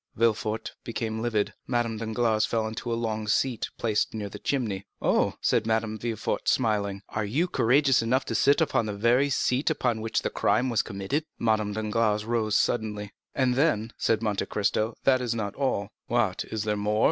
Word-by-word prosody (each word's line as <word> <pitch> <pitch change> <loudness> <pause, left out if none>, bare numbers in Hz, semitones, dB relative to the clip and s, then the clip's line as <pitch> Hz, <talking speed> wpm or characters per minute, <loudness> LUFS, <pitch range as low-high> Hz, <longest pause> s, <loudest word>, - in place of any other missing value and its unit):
Villefort 110 -1 0
became 110 -1 -3
livid; 110 -3 0
Madame 120 -3 0
Danglars 110 0 +1
fell 115 -1 0
into 110 +2 -4
a - - +1
long 110 -2 -2
seat 120 +2 0
placed 110 -1 0
near 105 -2 -4
the - - -9
chimney. 110 -9 -2
"Oh," - - +2
said 110 -1 +2
Madame 110 -1 0
de 120 - -4
Villefort, 115 -3 -2
smiling, 100 -3 0
"are 110 - -2
you 135 - 0
courageous 135 -3 +3
enough 125 +4 +1
to - - -3
sit 140 - +4
down 160 - +4
upon 115 - +1
the 105 - -2
very 120 +7 +3
seat 130 0 0
perhaps 160 - +2
upon 120 -3 0
which 110 0 -1
the - - -1
crime 130 +1 +1
was 115 - +3
committed?" 115 +10 -3
Madame 110 -2 +1
Danglars 110 0 0
rose 110 -2 +1
suddenly. 105 -3 -1 0.2
"And 130 -2 +2
then," 125 -5 +1
said 115 0 +1
Monte 105 -3 -1
Cristo, 110 +2 0
"this 130 -1 +4
is 120 -2 -1
not 105 -3 -3
all." 130 -8 -1 0.2
"What - - 0
is 110 -2 -3
there 105 -1 0
more?" 105 +1 0
110 Hz, 195 wpm, -27 LUFS, 105-120 Hz, 0.2 s, sit